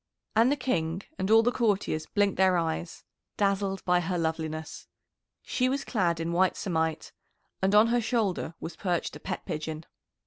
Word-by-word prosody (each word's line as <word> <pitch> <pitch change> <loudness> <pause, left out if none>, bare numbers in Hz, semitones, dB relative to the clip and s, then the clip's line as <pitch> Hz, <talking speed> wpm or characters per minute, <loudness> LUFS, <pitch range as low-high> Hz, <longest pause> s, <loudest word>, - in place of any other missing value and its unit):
And 230 +4 +5
the - - +3
King 190 - -1 0.2
and 190 - -1
all 225 +1 +7
the 245 - +3
courtiers 200 -10 0
blinked 205 -2 +1
their 190 -1 +4
eyes, 165 0 -3 0.3
dazzled 195 -1 0
by 180 -1 +4
her 175 +1 -2
loveliness. 160 -1 -3 0.6
She 255 0 0
was 275 +1 -2
clad 175 -8 0
in 165 +1 -2
white 185 +2 +2
samite, 160 -4 -1 0.5
and 195 +2 +2
on 215 +2 +6
her 240 0 +2
shoulder 215 -7 -1
was 165 - -6
perched 175 -1 -2
a - - -8
pet 185 -2 -5
pigeon. 155 -2 -4
185 Hz, 170 wpm, -28 LUFS, 165-215 Hz, 0.6 s, all